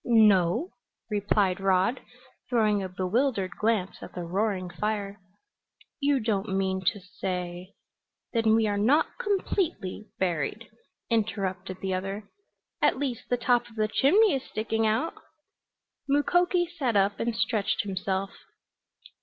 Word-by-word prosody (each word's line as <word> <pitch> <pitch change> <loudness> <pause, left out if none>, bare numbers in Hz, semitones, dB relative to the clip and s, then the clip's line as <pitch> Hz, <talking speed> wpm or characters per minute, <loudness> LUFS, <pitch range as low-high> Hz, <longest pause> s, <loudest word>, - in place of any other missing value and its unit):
"No," 220 - +4 0.4
replied 200 -2 +1
Rod, 195 +5 +2 0.5
throwing 215 -4 +2
a 190 - -4
bewildered 190 +2 0
glance 215 -4 0
at - - -10
the 180 - -4
roaring 190 +1 -1
fire. 200 +2 -3 0.8
"You 280 -1 +2
don't 205 -3 -1
mean 190 -1 0
to 205 - +1
say 180 0 -5 0.3
" - - -56
"Then 225 -2 +3
we 225 0 +3
are 205 -1 0
not 270 - +2
completely, 370 - -1
buried," 180 +4 -1 0.4
interrupted 190 -4 -1
the 190 -1 -1
other. 195 +2 -4 0.5
"At - - +3
least 260 -4 -3
the 245 - +2
top 240 0 +2
of 225 - -17
the 215 -1 +1
chimney 345 - +4
is 270 - 0
sticking 220 +1 -1
out!" 225 +10 0 1.0
Mukoki 350 +5 +3
sat 250 -6 +1
up 200 0 +2
and 235 -1 -1
stretched 215 -2 0
himself. 195 0 -2
210 Hz, 130 wpm, -27 LUFS, 190-235 Hz, 1.0 s, No